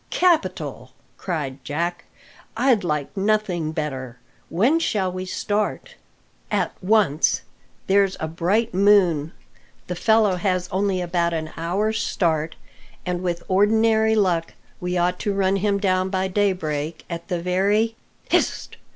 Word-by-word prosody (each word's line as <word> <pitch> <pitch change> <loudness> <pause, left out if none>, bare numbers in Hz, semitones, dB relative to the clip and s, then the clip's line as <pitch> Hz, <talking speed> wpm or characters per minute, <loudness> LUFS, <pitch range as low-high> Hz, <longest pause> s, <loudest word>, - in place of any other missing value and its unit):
"Capital!" 345 -3 0 0.3
cried 145 -7 -4
Jack; 170 +4 -3 0.5
"I'd 245 -4 +3
like 150 -2 -2
nothing 195 -6 0
better. 130 -6 -4 0.3
When 240 - +3
shall 195 - 0
we 185 +1 -5
start?" 210 +3 -2 0.6
"At - - 0
once. 185 -6 +2 0.4
There's 195 0 +2
a 160 - -2
bright 180 +8 0
moon, 180 -6 +4 0.5
the 180 - -4
fellow 215 0 +3
has 185 -1 0
only 190 -1 0
about 170 -1 0
an 160 -1 -3
hour's 205 +7 -1
start, 160 -6 0 0.5
and 180 -1 -2
with 175 -2 -2
ordinary 220 +3 +3
luck 180 -6 +1 0.2
we 180 0 -2
ought 180 +1 +1
to 205 - -1
run 195 0 +2
him 200 +1 +1
down 185 -2 +1
by 190 0 0
daybreak 170 -6 -1
at 170 -1 -6
the 180 -2 -2
very 200 +6 +1 0.2
" - - -34
"Hist!" - - 0
185 Hz, 135 wpm, -23 LUFS, 170-205 Hz, 0.6 s, moon